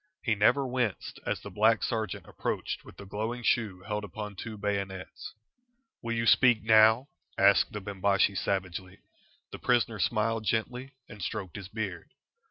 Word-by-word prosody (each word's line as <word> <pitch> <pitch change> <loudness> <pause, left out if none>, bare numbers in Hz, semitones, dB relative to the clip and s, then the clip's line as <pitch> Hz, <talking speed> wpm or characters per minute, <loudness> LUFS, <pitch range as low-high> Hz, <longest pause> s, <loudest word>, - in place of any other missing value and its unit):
He 115 - +2
never 125 +7 +3
winced 125 -5 -2
as - - -1
the - - -9
black 110 +1 +3
sergeant 110 -2 -2
approached - - -3
with - - -14
the 100 - -9
glowing 110 +5 -4
shoe 105 -6 +1
held 105 +1 -3
upon 105 0 -6
two 110 +3 -7
bayonets. 100 -2 -4 0.7
"Will 115 0 -2
you 115 0 0
speak 120 -1 +5
now?" 110 +4 +5 0.3
asked - - +5
the 105 - -5
Bimbashi, 100 0 +1
savagely. 95 -1 -3 0.5
The - - -8
prisoner 120 -3 +1
smiled 110 +4 +1
gently 125 +5 -2
and 105 - -11
stroked 95 -1 -4
his 100 -3 -7
beard. 100 -5 -6
105 Hz, 155 wpm, -29 LUFS, 100-115 Hz, 0.7 s, speak